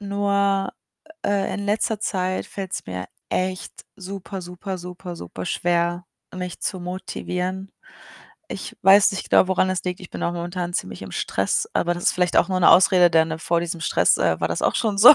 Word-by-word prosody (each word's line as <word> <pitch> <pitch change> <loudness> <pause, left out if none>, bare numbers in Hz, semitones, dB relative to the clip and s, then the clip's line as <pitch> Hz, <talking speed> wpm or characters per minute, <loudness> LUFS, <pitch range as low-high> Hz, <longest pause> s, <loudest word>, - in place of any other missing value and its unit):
Nur, 200 -1 +1 0.6
äh, 200 -1 0
in 200 0 -4
letzter 215 +1 0
Zeit 185 -3 -1
fällt's 190 -2 -5
mir 90 0 -5 0.2
echt 185 0 -2 0.2
super 195 0 -7
super 180 +2 -6
super 180 0 -8
superschwer, 170 - -1 0.3
mich 180 -1 -5
zu 185 -3 -2
motivieren. 185 +1 -4 0.8
Ich 190 - -7
weiß 195 +2 +7
nicht 195 - -5
genau, 185 - +5
woran 190 0 +2
das 185 -2 -1
liegt. 180 -1 -3
Ich 180 - -11
bin - - -6
auch 170 - 0
momentan 175 0 -4
ziemlich 95 0 -3
im 95 -2 -8
Stress, - - 0
aber 175 0 +1
das 175 - -6
ist - - +4
vielleicht 180 -1 0
auch - - +4
nur 185 -1 0
'ne - - +7
Ausrede, 180 -1 +6
denn, 160 -1 +4
ne, 160 0 -4
vor 170 +1 0
diesem 170 0 -4
Stress, - - +3
äh, - - +2
war - - +1
das - - -2
auch - - +2
schon 215 -4 0
so, 245 +9 +11
185 Hz, 190 wpm, -23 LUFS, 175-195 Hz, 0.8 s, so